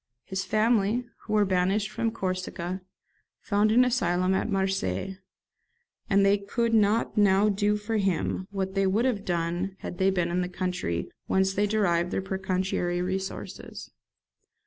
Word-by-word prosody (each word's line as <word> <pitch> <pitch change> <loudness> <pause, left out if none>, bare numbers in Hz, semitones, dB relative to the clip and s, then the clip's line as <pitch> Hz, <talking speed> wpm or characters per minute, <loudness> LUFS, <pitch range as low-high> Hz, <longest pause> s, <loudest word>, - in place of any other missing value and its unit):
His 190 0 -3
family, 220 +2 +2 0.2
who 215 - -4
were 210 -1 +4
banished 190 +3 +1
from 225 - 0
Corsica, 185 -3 -3 0.6
found 210 0 +2
an 250 +3 +5
asylum 185 -6 +1
at 190 - 0
Marseilles; 190 - -1 0.9
and 195 0 +4
they 200 +1 +4
could 230 +4 -1
not 215 +1 +2
now 200 +1 +4
do 205 +1 +1
for 215 +2 -2
him 190 -1 -1
what 190 -1 -3
they 195 -1 +2
would 215 +6 +2
have 225 -6 0
done 175 +2 -2
had 175 - -6
they 190 0 +4
been 175 -3 0
in 180 +1 +1
the 180 - -2
country 180 - -3 0.2
whence 190 0 +2
they 205 +2 +1
derived 180 -5 +1
their - - -1
pecuniary 190 -2 -1
resources. 190 +1 -5
195 Hz, 150 wpm, -27 LUFS, 185-210 Hz, 0.9 s, an